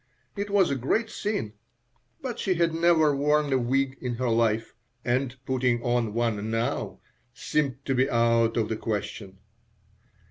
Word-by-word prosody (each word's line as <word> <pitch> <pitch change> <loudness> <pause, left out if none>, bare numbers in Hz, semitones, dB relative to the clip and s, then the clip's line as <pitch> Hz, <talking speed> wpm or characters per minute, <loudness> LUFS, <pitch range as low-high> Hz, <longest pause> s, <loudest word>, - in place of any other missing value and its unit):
It 205 0 -3
was 200 -5 +3
a - - +1
great 215 - 0
sin, 205 - -3 0.7
but 250 -3 -4
she 190 -2 +1
had 170 -1 +1
never 165 -3 +4
worn 150 0 +2
a 130 - +3
wig 135 +2 0
in 125 -2 -2
her 125 +1 -1
life, 115 -1 +1 0.3
and 125 +1 0
putting 125 -2 +1
on 120 -3 0
one 110 -3 -1
now 115 +1 -2 0.3
seemed 140 -1 -1
to 135 - 0
be 130 +2 +2
out 115 -1 +2
of 110 -2 0
the 110 - -2
question. 105 -3 -4
130 Hz, 155 wpm, -26 LUFS, 115-150 Hz, 0.7 s, never